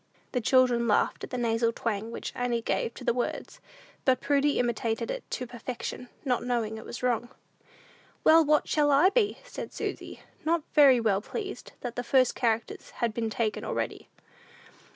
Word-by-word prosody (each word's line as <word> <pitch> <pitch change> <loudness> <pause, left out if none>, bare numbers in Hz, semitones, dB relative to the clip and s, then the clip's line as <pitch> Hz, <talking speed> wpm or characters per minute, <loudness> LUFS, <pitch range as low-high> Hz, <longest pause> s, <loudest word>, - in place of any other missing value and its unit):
The 250 - 0
children 245 -1 +3
laughed 210 - +1
at - - -5
the 250 - -4
nasal 230 -1 +1
twang 225 -1 -3
which 230 - -5
Annie 240 -2 -1
gave 230 - -1
to - - -9
the - - +2
words, 245 0 -3 0.5
and 255 -1 +4
Prudy 285 +1 +2
imitated 235 - -1
it - - -5
to 255 - -3
perfection, 245 +1 -6 0.2
not 250 -2 +1
knowing 235 -3 -1
it - - -11
was 245 - -7
wrong. 240 -1 0 0.9
"Well, 325 +1 +7
what 300 0 +2
shall 295 -1 +2
I 290 +7 +5
be?" 420 -2 +2
said - - -7
Susy, - - -5 0.2
not 325 0 +1
very 275 -5 +7
well 205 -4 +1
pleased 395 - -6
that 245 -1 -5
the 245 - -3
first 255 +1 +3
characters 230 -2 -1
had 235 -2 -1
been 225 0 -2
taken 220 -1 -1
already. - - -3
245 Hz, 175 wpm, -28 LUFS, 230-280 Hz, 0.9 s, Well